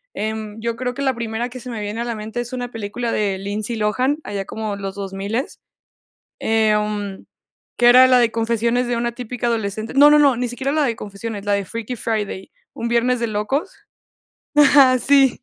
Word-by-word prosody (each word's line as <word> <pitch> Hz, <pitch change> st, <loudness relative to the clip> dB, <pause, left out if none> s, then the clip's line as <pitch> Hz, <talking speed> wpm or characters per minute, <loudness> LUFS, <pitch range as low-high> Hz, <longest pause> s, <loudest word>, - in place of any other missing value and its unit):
Em, 215 Hz, 0 st, -4 dB
yo 230 Hz, 0 st, -2 dB
creo 250 Hz, +1 st, -3 dB
que 275 Hz, -, -6 dB
la 265 Hz, -2 st, +1 dB
primera 235 Hz, +1 st, -3 dB
que 255 Hz, -, -9 dB
se 250 Hz, 0 st, -9 dB
me 230 Hz, -3 st, -5 dB
viene 210 Hz, +3 st, -4 dB
a -, -, 0 dB
la 235 Hz, -1 st, -3 dB
mente 215 Hz, +3 st, -6 dB
es 240 Hz, +1 st, -7 dB
una 245 Hz, -1 st, -4 dB
película 225 Hz, +2 st, -4 dB
de 200 Hz, -3 st, 0 dB
Lindsay 205 Hz, +4 st, -3 dB
Lohan, 250 Hz, +7 st, +1 dB
allá 200 Hz, -1 st, -4 dB
como 215 Hz, 0 st, -4 dB
los 195 Hz, -1 st, -6 dB
2000, 200 Hz, +5 st, -4 dB, 0.8 s
em, 210 Hz, -2 st, 0 dB, 0.5 s
que 240 Hz, -, +3 dB
era 255 Hz, +1 st, +8 dB
la 255 Hz, -1 st, +5 dB
de 235 Hz, -2 st, +3 dB
Confesiones 235 Hz, +2 st, 0 dB
De 240 Hz, 0 st, -1 dB
Una 235 Hz, 0 st, -1 dB
Típica 245 Hz, 0 st, -5 dB
Adolescente 220 Hz, -1 st, -2 dB
No 290 Hz, +2 st, +7 dB
no 300 Hz, -, +6 dB
no 280 Hz, -4 st, +5 dB
ni 245 Hz, +1 st, -1 dB
siquiera 265 Hz, +3 st, -3 dB
la 310 Hz, 0 st, +2 dB
de 235 Hz, -4 st, -1 dB
confesiones, 205 Hz, 0 st, -6 dB
la 205 Hz, -, 0 dB
de 200 Hz, 0 st, +1 dB
Freaky 230 Hz, +4 st, -5 dB
Friday, 210 Hz, -4 st, -3 dB, 0.2 s
Un 235 Hz, -, -3 dB
Viernes 240 Hz, +1 st, +1 dB
de 235 Hz, -, 0 dB
Locos. 245 Hz, -, -2 dB, 0.8 s
Ajá, 275 Hz, -3 st, +6 dB
sí. 270 Hz, -1 st, +3 dB
230 Hz, 200 wpm, -20 LUFS, 210-250 Hz, 0.8 s, era